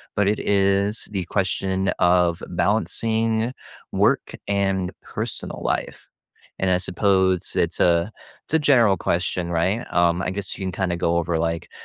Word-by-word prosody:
but 105 -1 +2
it 105 +1 +1
is 100 +1 +1
the 95 -3 -2
question 95 0 -1
of 90 -1 +3
balancing 115 +1 0 0.4
work - - +1
and 95 -2 0
personal - - -5
life. - - -3 0.5
And, 95 - +2
I 90 - +3
suppose 95 0 +1
it's - - 0
a 85 +3 +3 0.3
it's - - -11
a 160 - +5
general 120 -10 +4
question, 90 0 -1
right, 85 +6 +1
um 85 0 +3
I - - -1
guess 95 +1 -5
you 95 - -4
can 95 - -2
kinda 90 -3 -1
go 85 0 +1
over, 85 -1 0
like, 85 0 -2
95 Hz, 150 wpm, -23 LUFS, 90-100 Hz, 0.5 s, a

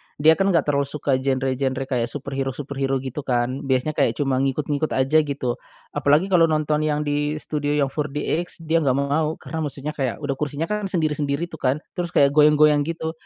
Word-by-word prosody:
dia 155 +2 +5
kan 195 - +3
enggak 170 -6 +3
terlalu 140 -1 0
suka 140 -2 -1
genre-genre 130 0 -1
kayak 125 -3 -1
superhero-superhero 135 +1 -3
gitu 130 +2 -5
kan, 125 +2 0
biasanya 130 +3 +1
kayak - - +2
cuma 135 -3 0
ngikut-ngikut 145 +2 -1
aja, 135 +4 +3
gitu. 140 -5 -2 0.3
Apalagi 155 +7 +2
kalau 170 -2 +5
nonton 155 -1 +1
yang 150 0 0
di 145 +1 -1
studio 150 -1 -2
yang 140 -2 +1
4DX 150 +4 -3
dia 165 +1 +2
enggak 135 -4 +1
mau, 150 +3 0
karena 160 - -6
maksudnya 145 0 -4
kayak 135 -5 -2
udah 140 - -1
kursinya 150 +1 -2
kan 210 -1 -1
sendiri-sendiri 155 -1 -1
tuh 160 - -9
kan, 130 0 +2 0.2
terus 175 -1 -4
kayak 140 0 +5
goyang-goyang 150 0 +5
gitu 160 -1 -3
145 Hz, 180 wpm, -23 LUFS, 135-155 Hz, 0.3 s, dia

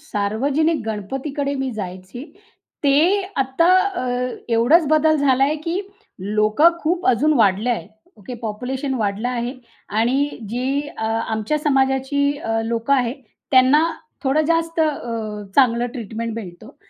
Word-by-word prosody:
सार्वजनिक 280 +6 0
गणपतीकडे 270 +7 -3
मी 270 -1 -2
जायची 190 +4 -7 0.6
ते 330 +9 +4
आता 270 +5 +1 0.3
अ, - - -3 0.5
एवढाच 285 +8 +4
बदल 310 0 +4
झालाय, 275 0 +2
की 335 +5 -3 0.4
लोकं 215 - +3
खूप 350 +3 0
अजून 275 +6 +3
वाढले 210 +2 +3
आहे. 230 - -3 0.3
ओके. 215 +4 -9
पॉप्युलेशन 255 +5 -3
वाढलं 215 0 -1
आहे 245 +1 -3 0.5
आणि 265 +5 +2 0.2
जी 265 +5 -1
अ, 220 - -4
आमच्या 225 +4 -1
समाजाची 280 0 +1
अ, 225 -5 -1
लोकं 230 +4 0
आहे, 245 -2 +1 0.4
त्यांना 265 +4 +5 0.4
थोडं 275 +3 +2
जास्त 330 0 0
अ, 230 -8 -2
चांगलं 245 -2 +4
ट्रीटमेंट 230 -2 -5
मिळतो 180 -6 -9
260 Hz, 125 wpm, -21 LUFS, 225-290 Hz, 0.6 s, त्यांना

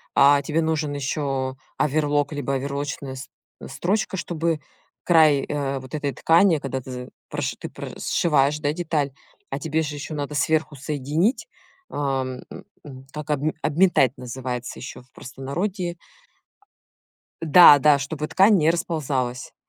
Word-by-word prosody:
а, 140 0 +6
тебе 155 +3 0
нужен 155 -2 -1
ещё 135 -2 -2 0.2
оверлок, 145 0 +1
либо 140 -1 -2
оверлочная 140 0 -4
с 130 - -9 0.4
строчка, 190 +8 -1
чтобы 165 -2 -1 0.4
край, 155 -5 +5
э, 140 -2 -2
вот 130 +3 -8
этой 145 -3 -2
ткани, 165 +4 +4
когда 135 -1 -4
ты 130 - -10
з 125 0 -7 0.2
проши - - -3
ты - - -7
про - - -8
сшиваешь, 150 -2 +2
да, 145 0 0
деталь. 155 -5 -1 0.4
А - - -3
тебе 160 0 -1
же 150 -1 -4
ещё 145 +2 -6
надо 145 0 -4
сверху 155 0 +1
соединить. 150 - -1 0.4
Ом, 135 -3 -2
э, - - -9 0.4
э, - - -9 0.2
так, 150 0 -7
обме 150 +2 0
обметать 150 -5 +3
называется 125 0 -5
ещё 130 - -8
в 125 - -31
простонародье. 175 +7 -4 1.4
А. - - -3
Да 150 -2 +9
да, 145 -1 +5
чтобы 150 +2 -4
ткань 200 +1 +5
не 155 0 +3
расползалась. 140 -7 -2
145 Hz, 145 wpm, -23 LUFS, 135-160 Hz, 1.4 s, Да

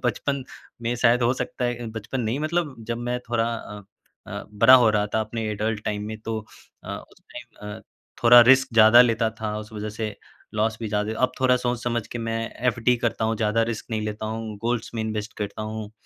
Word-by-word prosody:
बचपन 135 +3 -1 0.4
में 120 +1 0
शायद 120 0 +3
हो 120 - +3
सकता 125 - -3
है 120 0 0
अ, - - -5
बचपन 115 +4 -4
नहीं 115 +3 -1
मतलब 155 -2 -1
जब 115 0 -2
मैं 120 +1 -2
थोड़ा 115 -1 +2
अ 105 -2 -8 0.4
अ, - - -6
बड़ा 115 +5 +7
हो 120 -4 +6
रहा 105 -1 +1
था, 110 - +3
अपने 110 +1 -4
एडल्ट 105 +1 -2
टाइम 105 -1 -2
में, 110 0 -6
तो 110 0 -3 0.5
अ, - - -7 0.2
उस - - -22
टाइम 120 -4 -10
अ, - - -12 0.4
थोड़ा 120 +1 +9
रिस्क 135 0 +5
ज़्यादा 110 +2 +8
लेता 115 -2 +1
था। 105 -1 -2
उस 110 +1 -9
वजह 105 0 -5
से 110 -2 -4 0.4
लॉस 110 +1 +1
भी 110 - -3
ज़्यादा 105 0 -1
ही - - -3
अब 130 - 0
थोड़ा 130 -1 +4
सोच 120 -1 -2
समझ 120 -2 -1
के 120 - -5
मैं 115 0 -2 0.3
एफडी 120 +1 +2
करता 115 -1 -1
हूँ, 110 0 0
ज़्यादा 110 +1 +1
रिस्क 110 - -8
नहीं 110 -1 -1
लेता 105 0 -4
हूँ, 110 -1 -5
गोल्ड्स 120 -1 -1
में 115 - -1
इन्वेस्ट 110 -1 -4
करता 105 0 -4
हूँ, 110 -1 -5
115 Hz, 220 wpm, -24 LUFS, 110-120 Hz, 0.5 s, थोड़ा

